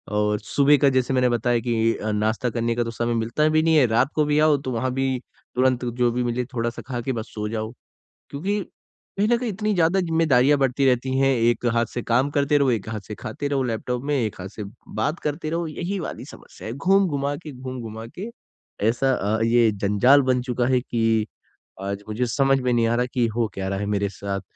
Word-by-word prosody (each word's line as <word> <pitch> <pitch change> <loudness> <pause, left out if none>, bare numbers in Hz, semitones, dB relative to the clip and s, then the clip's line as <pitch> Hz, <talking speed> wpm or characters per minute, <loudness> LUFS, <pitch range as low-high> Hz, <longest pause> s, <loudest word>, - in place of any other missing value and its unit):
और 105 0 +1
सुबह 140 +7 +3
का 140 +1 +4
जैसे 130 0 +1
मैंने 125 -1 +3
बताया 120 0 +1
कि 115 -1 +1
अ, 110 - -3
नाश्ता 110 +4 0
करने 115 0 -1
का 120 - +1
तो 115 - -4
समय 120 +1 -1
मिलता 115 +7 +1
भी 155 0 +3
नहीं 165 0 +3
है। 145 -4 +6
रात 120 +5 +2
को 150 - +3
भी 150 0 +2
आओ, 155 -1 +4
तो 130 -2 -5
वहाँ 130 +2 -1
भी 135 -1 0 0.4
तुरंत 130 0 +2
जो 120 0 +1
भी 125 +1 -1
मिले 120 +1 -1
थोड़ा-सा 120 -2 -3
खा 125 -2 -3
के 130 - -2
बस 110 -2 -6
सो 105 -1 -3
जाओ 110 0 -3 0.6
क्योंकि 195 +9 -2 0.6
कहीं 205 +2 +2
ना 240 - +4
कहीं 240 -1 -3
इतनी 210 +2 -1
ज़्यादा 175 +1 +3
ज़िम्मेदारियाँ 155 -6 +3
बढ़ती 135 0 +1
रहती 130 0 +1
हैं, 135 0 +3
एक 120 0 +1
हाथ 115 0 +2
से 120 - -2
काम 125 +5 +1
करते 145 +1 +2
रहो, 140 -3 +3
एक 110 -3 -2
हाथ 110 -1 -3
से 105 - -6
खाते 110 +8 -5
रहो 140 -2 0
लैपटॉप 125 +1 -3
में, 145 +1 0
एक 110 -5 -1
हाथ 95 - -5
से 105 +1 -7 0.3
बात 150 +10 -1
करते 150 +1 -2
रहो, 170 +1 -2
यही 175 +5 -4
वाली - - -6
समस्या - - -12
है। 110 - -4
घूम-घुमा 145 -3 +1
के, 155 0 -9
घूम-घुमा 125 -4 -7
के 205 +5 -5 0.6
ऐसा 125 +4 +2
अ, 110 -1 -1
ये 115 -1 +4
जंजाल 105 +8 +4
बन 130 -1 +1
चुका 125 -1 -1
है 130 -1 +3
कि 115 -3 +1 0.6
आज 100 +1 -4
मुझे 110 +4 -1
समझ 135 +2 +2
में 125 0 0
नहीं 115 -1 +2
आ 115 - +1
रहा 125 +1 +1
कि 125 -2 +2
हो 115 -1 +1
क्या 95 0 -4
रहा 95 0 -2
है 105 - -2
मेरे 100 -1 0
साथ? 100 0 -4
125 Hz, 225 wpm, -23 LUFS, 115-140 Hz, 0.6 s, है